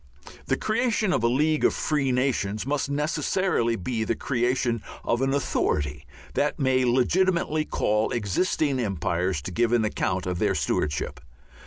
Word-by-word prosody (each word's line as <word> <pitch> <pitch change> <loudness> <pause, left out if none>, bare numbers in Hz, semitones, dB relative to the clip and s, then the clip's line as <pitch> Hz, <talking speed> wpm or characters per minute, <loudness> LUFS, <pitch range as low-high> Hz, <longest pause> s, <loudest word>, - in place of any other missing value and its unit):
The - - +1
creation 215 -3 +1
of 115 - 0
a - - +4
League 150 +5 +1
of - - +3
Free 145 -4 0
Nations 125 -5 0
must 140 0 -1
necessarily 150 -3 0
be 115 +3 -2
the 115 +1 -1
creation 120 -2 0 0.2
of 120 +2 0
an 135 0 +1
authority 75 - -1 0.3
that 145 - 0
may 130 -3 +2
legitimately 155 +5 +2
call 105 -5 0
existing 130 - 0
empires 90 - -1
to 90 - -5
give 115 +5 +1
an 115 -2 +3
account 95 -3 -1
of 90 -1 -2
their - - +1
stewardship. 75 -1 -1
125 Hz, 150 wpm, -25 LUFS, 105-145 Hz, 0.3 s, a